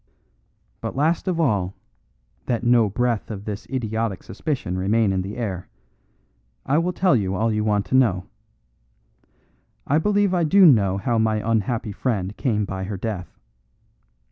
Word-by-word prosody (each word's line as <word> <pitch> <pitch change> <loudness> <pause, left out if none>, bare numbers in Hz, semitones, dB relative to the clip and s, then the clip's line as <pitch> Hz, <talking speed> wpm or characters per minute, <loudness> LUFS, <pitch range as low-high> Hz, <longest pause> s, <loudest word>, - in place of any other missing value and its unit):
"But - - -4
last 160 +7 +1
of 180 -3 0
all, 100 - +1 0.7
that 120 -1 -1
no 120 -3 +4
breath 120 +1 -1
of 105 -2 -6
this 105 0 -6
idiotic 110 -5 -2
suspicion 135 - -3
remain 100 +2 +2
in 95 - 0
the 100 +4 -6
air, 95 -7 -4 1.0
I 145 +4 +2
will 175 +2 0
tell 180 -4 +2
you 95 -4 0
all 110 +3 +1
you 105 0 0
want 105 -2 +1
to - - -1
know. 100 -9 +3 1.6
I 145 +3 +2
believe 205 +1 +2
I 175 -2 +2
do 190 +5 +6
know 100 - +5
how 115 +3 0
my 110 -1 +2
unhappy 110 0 0
friend 100 -3 -2
came 110 -6 0
by 95 -1 -4
her 100 0 -4
death. 95 -4 -5
110 Hz, 155 wpm, -23 LUFS, 100-130 Hz, 1.6 s, do